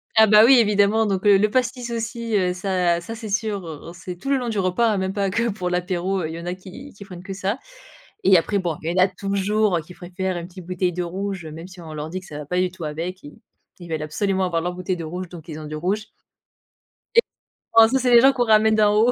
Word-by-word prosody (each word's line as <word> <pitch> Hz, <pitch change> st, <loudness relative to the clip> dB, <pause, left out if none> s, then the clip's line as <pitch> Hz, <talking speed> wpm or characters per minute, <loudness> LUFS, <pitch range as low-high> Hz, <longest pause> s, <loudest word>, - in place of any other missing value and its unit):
Ah 220 Hz, 0 st, +7 dB
bah, 215 Hz, +1 st, +7 dB
oui, 255 Hz, -1 st, +7 dB
évidemment, 210 Hz, 0 st, +3 dB
donc 195 Hz, 0 st, -1 dB
heu, 200 Hz, -1 st, +7 dB
le 215 Hz, -, +3 dB
pastis 250 Hz, +1 st, -1 dB
aussi, 230 Hz, -1 st, -3 dB
heu, 180 Hz, -1 st, +1 dB
ça 180 Hz, -2 st, 0 dB
ça, 225 Hz, +6 st, -7 dB
c'est 220 Hz, -1 st, -7 dB
sûr, 205 Hz, -2 st, -2 dB
heu, 160 Hz, +1 st, -8 dB
c'est 180 Hz, +1 st, -7 dB
tout 230 Hz, +10 st, -7 dB
le 275 Hz, -, +3 dB
long 245 Hz, -, -3 dB
du 215 Hz, -3 st, -1 dB
repas 205 Hz, +4 st, +2 dB
même 190 Hz, 0 st, -1 dB
pas 195 Hz, -1 st, -1 dB
que 230 Hz, +3 st, 0 dB
pour 185 Hz, -4 st, -3 dB
l'apéro, 180 Hz, +1 st, -1 dB
il 160 Hz, -, -5 dB
y -, -, -6 dB
en 170 Hz, -, -8 dB
a 175 Hz, -, -2 dB
qui 190 Hz, +10 st, -11 dB
qui 200 Hz, -, -11 dB
prennent 180 Hz, -2 st, -11 dB
que 195 Hz, -, -6 dB
ça 195 Hz, +4 st, -2 dB, 0.7 s
et 190 Hz, -, +7 dB
après 200 Hz, +4 st, +1 dB
bon, 175 Hz, -5 st, -2 dB
il 160 Hz, -, -2 dB
y 185 Hz, -, +1 dB
en -, -, +7 dB
a -, -, +4 dB
toujours 200 Hz, 0 st, 0 dB
qui 180 Hz, -, -12 dB
préfèrent 185 Hz, +1 st, -4 dB
une 170 Hz, 0 st, -6 dB
petite 180 Hz, -1 st, -12 dB
bouteille 180 Hz, 0 st, -1 dB
de 180 Hz, +1 st, -3 dB
rouge 190 Hz, 0 st, -4 dB
même 160 Hz, +3 st, -9 dB
si 185 Hz, -1 st, -13 dB
on 160 Hz, -2 st, -9 dB
leur 150 Hz, +1 st, -5 dB
dit 185 Hz, -, -4 dB
que 185 Hz, -, -12 dB
ça 150 Hz, -, -9 dB
va 150 Hz, -, -7 dB
pas 180 Hz, +5 st, -1 dB
du 180 Hz, -1 st, +1 dB
tout 185 Hz, -, -11 dB
avec, 165 Hz, +5 st, -5 dB
ils 145 Hz, -, -12 dB, 0.4 s
ils 175 Hz, -2 st, -11 dB
veulent 160 Hz, -2 st, -3 dB
absolument 190 Hz, +5 st, -1 dB
avoir 170 Hz, -2 st, 0 dB
leur 180 Hz, -, -2 dB
bouteille 180 Hz, 0 st, -3 dB
de 170 Hz, -, -6 dB
rouge, 180 Hz, +3 st, -5 dB
donc 165 Hz, -3 st, -11 dB
ils 155 Hz, -, -6 dB
ont 155 Hz, -, -8 dB
du 155 Hz, 0 st, -6 dB
rouge 195 Hz, +7 st, -1 dB, 1.1 s
et 465 Hz, -, +8 dB, 0.5 s
oh 225 Hz, 0 st, +9 dB
ça, 265 Hz, -, +2 dB
c'est 250 Hz, -1 st, +1 dB
les 235 Hz, -, +9 dB
gens 270 Hz, +2 st, +6 dB
qu'on 245 Hz, -2 st, +1 dB
ramène 220 Hz, 0 st, +4 dB
d'en 210 Hz, -1 st, +4 dB
haut. 225 Hz, +3 st, +4 dB
190 Hz, 270 wpm, -22 LUFS, 175-215 Hz, 1.1 s, oh